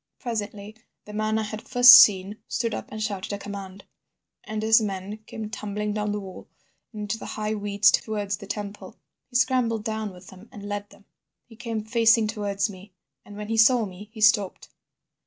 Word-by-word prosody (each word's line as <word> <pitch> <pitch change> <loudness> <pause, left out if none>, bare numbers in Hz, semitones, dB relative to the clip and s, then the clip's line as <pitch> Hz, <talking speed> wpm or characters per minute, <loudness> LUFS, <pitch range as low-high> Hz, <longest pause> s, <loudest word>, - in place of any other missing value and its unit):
"Presently 210 -3 -5 0.3
the 210 - -10
man 215 +1 0
I 220 - -1
had 215 0 -7
first 245 -1 +8
seen 200 +1 +5
stood 230 -2 -2
up - - -5
and 215 0 -4
shouted 205 -2 -4
a - - -2
command, 200 -1 -9 0.6
and 215 0 -5
his 220 +1 +5
men 200 0 -4
came 220 -1 -6
tumbling 210 -2 -4
down 210 0 -2
the 210 - -2
wall 190 -2 -11 0.4
and 215 -3 -8
into 210 +2 -3
the - - -8
high 215 0 -3
weeds 205 -1 +3
towards 205 -2 -1
the 200 -1 -11
temple. 205 0 -7 0.3
He 245 - -18
scrambled 245 -4 +1
down 220 -1 -3
with 180 0 -14
them 190 +4 -15
and 205 -1 -9
led 205 0 -5
them. 200 - -20 0.4
He 230 - -16
came 225 -2 -4
facing 230 0 +3
towards 205 -2 -2
me, 195 -1 -13 0.3
and 205 - -12
when 210 0 -7
he 225 - -1
saw 225 +1 +5
me 200 +2 -11
he 220 - -10
stopped. 205 -3 +2
210 Hz, 195 wpm, -25 LUFS, 200-220 Hz, 0.6 s, first